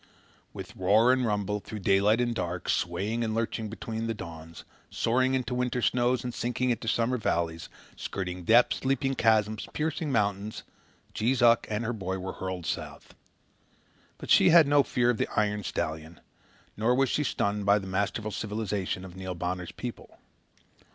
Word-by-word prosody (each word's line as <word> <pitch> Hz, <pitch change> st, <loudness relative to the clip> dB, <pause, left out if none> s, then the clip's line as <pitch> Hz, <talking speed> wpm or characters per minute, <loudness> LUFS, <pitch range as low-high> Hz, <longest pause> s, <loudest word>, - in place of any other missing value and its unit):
With -, -, -9 dB
roar 110 Hz, +7 st, +4 dB
and 130 Hz, -2 st, +1 dB
rumble, 105 Hz, -1 st, -1 dB
through 110 Hz, -, -8 dB
daylight 100 Hz, +3 st, +4 dB
and 120 Hz, -1 st, +1 dB
dark, 90 Hz, -5 st, -4 dB
swaying 110 Hz, +4 st, -1 dB
and 110 Hz, -1 st, -2 dB
lurching 115 Hz, -1 st, -2 dB
between 115 Hz, +1 st, -5 dB
the 115 Hz, -, -2 dB
dawns, 80 Hz, -3 st, -9 dB, 0.3 s
soaring 130 Hz, +3 st, +1 dB
into 125 Hz, -2 st, -2 dB
the -, -, -2 dB
winter 125 Hz, 0 st, -1 dB
snows 120 Hz, 0 st, +1 dB
and 125 Hz, -1 st, -4 dB
sinking 125 Hz, 0 st, 0 dB
to 115 Hz, -, -10 dB
summer 120 Hz, +2 st, +1 dB
valleys, 85 Hz, -6 st, -2 dB, 0.3 s
skirting 90 Hz, -2 st, -5 dB
depths, 115 Hz, +6 st, +4 dB
leaping 135 Hz, 0 st, +1 dB
chasms, 110 Hz, -3 st, +2 dB
piercing 155 Hz, 0 st, -2 dB
mountains, 105 Hz, -2 st, -1 dB, 0.5 s
Jees 120 Hz, +3 st, +1 dB
Uck 115 Hz, -1 st, +5 dB
and 110 Hz, +2 st, -2 dB
her 120 Hz, -, -1 dB
boy 95 Hz, -3 st, -3 dB
were 95 Hz, 0 st, -5 dB
hurled 95 Hz, -2 st, -5 dB
south. -, -, -5 dB, 1.0 s
But -, -, -6 dB
she -, -, +7 dB
had 165 Hz, -1 st, +8 dB
no 145 Hz, 0 st, +5 dB
fear 120 Hz, -3 st, +1 dB
of 115 Hz, -, -4 dB
the -, -, +1 dB
iron 105 Hz, -1 st, 0 dB
stallion; 80 Hz, -1 st, -4 dB, 0.6 s
nor 115 Hz, +4 st, +2 dB
was 135 Hz, 0 st, +2 dB
she 150 Hz, -, 0 dB
stunned 100 Hz, -6 st, -1 dB
by 100 Hz, +1 st, +6 dB
this 95 Hz, -2 st, -5 dB
masterful 100 Hz, +3 st, -2 dB
civilization 105 Hz, -3 st, -3 dB
of 90 Hz, -1 st, -11 dB
Neil 95 Hz, -1 st, -5 dB
Bonner's 90 Hz, 0 st, -4 dB
people. 125 Hz, -2 st, -8 dB
110 Hz, 170 wpm, -28 LUFS, 95-120 Hz, 1.0 s, had